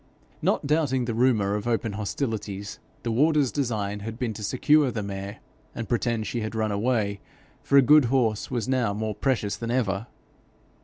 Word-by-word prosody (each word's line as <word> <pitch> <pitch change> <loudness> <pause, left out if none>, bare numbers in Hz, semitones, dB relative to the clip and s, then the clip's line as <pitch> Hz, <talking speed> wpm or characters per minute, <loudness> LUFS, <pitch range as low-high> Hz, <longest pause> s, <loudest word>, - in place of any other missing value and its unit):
Not - - +1
doubting 140 -4 +1
the 120 - -2
rumour 110 -4 +2
of 105 +2 -3
open 115 -2 0
hostilities, 105 -1 -4 0.2
the 115 - -1
warder's 145 +2 +3
design 105 -7 -2
had 110 +2 -6
been 120 -3 -2
to 105 - -8
secure 145 +5 +3
the 110 -3 -3
mare, 100 +1 -6 0.4
and 115 - -4
pretend 115 -1 0
she 120 - -3
had 110 +1 -4
run 110 -1 0
away, 105 -1 0 0.4
for 140 - +3
a 135 - +8
good 150 +2 +6
horse 115 -4 +1
was 120 -4 -2
now 125 -6 +1
more 110 0 -2
precious 110 -3 0
than 115 - -5
ever. 115 -3 0
115 Hz, 175 wpm, -26 LUFS, 105-130 Hz, 0.4 s, a